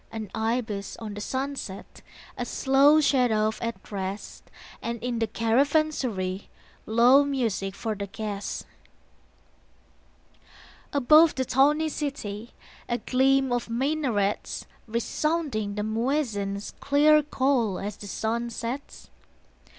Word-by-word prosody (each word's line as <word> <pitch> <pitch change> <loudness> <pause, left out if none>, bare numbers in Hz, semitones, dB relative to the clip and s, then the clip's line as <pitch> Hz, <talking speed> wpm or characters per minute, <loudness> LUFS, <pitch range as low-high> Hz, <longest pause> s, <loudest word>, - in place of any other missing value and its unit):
An 215 -3 -6
ibis 220 -3 -2
on 215 -2 -6
the 205 - -6
sunset, 260 -5 -5 0.3
A - - -3
slow 280 +3 +4
shadouf 235 -7 +2
at 230 -4 -5
rest, 195 0 -5 0.3
And 235 0 -3
in 245 -2 -1
the 225 - +1
caravansary 230 -5 0 0.4
Low 245 +5 +6
music 230 -9 -1
for 220 +1 -3
the 200 -1 -5
guest. 205 -1 -5 2.3
Above 305 +4 +6
the 260 - -1
tawny 295 +5 +3
city 240 -8 -5 0.3
A 240 - +1
gleam 265 +1 +2
of 245 -1 -1
minarets, 240 -5 -1 0.2
Resounding 235 -2 -1
the 210 - -2
muezzin's 220 -4 -1
Clear 300 +2 +5
call 260 -8 +1
as 205 +1 -4
the 205 - -10
sun 230 +4 -2
sets. 235 +4 -6
235 Hz, 110 wpm, -26 LUFS, 210-275 Hz, 2.3 s, Low